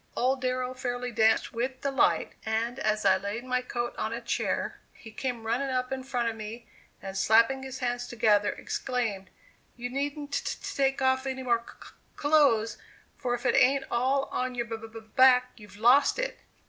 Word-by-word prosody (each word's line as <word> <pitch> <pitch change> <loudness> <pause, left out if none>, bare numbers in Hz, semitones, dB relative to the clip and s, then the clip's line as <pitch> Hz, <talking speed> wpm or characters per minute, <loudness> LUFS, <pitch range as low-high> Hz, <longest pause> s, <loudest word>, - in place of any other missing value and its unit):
Old 260 +1 +1
Darrow 255 0 -1
fairly 245 -1 -3
danced 220 0 +2
with 255 +3 -3
delight, 275 -1 +1
and 230 +3 -1
as 215 -2 0
I 190 -1 +6
laid 200 +5 -4
my 255 0 0
coat 240 -1 -3
on 220 - -1
a 230 - -3
chair 235 - -2
he 225 - -13
came 240 -1 -4
running 250 +5 0
up 255 0 -1
in 265 0 -2
front 250 -3 -1
of 230 - -2
me, 225 +2 -8 0.4
and 195 -1 -6
slapping 230 +6 +4
his 265 0 -6
hands 245 0 -2
together, 210 -3 +3
exclaimed: 225 -8 -3 0.5
"You 245 0 -5
needn't 285 +2 -3
t - - 0 0.2
t - - -6
take 270 -1 +1
off 260 +1 +2
any 260 0 -3
more 240 -2 +2
c - - -12
c - - -11
c - - -21 0.2
clothes, 285 -7 +3 0.4
for 245 -1 -1
if 245 +2 -9
it - - +3
ain't 270 +2 +4
all 265 +3 +2
on 255 0 -2
your 240 -1 -1
b 230 -1 -4 0.2
b 225 - -8
back, 250 +2 +4
you've 210 -2 -14
lost 245 - +5
it." - - -3
245 Hz, 195 wpm, -28 LUFS, 225-260 Hz, 0.5 s, I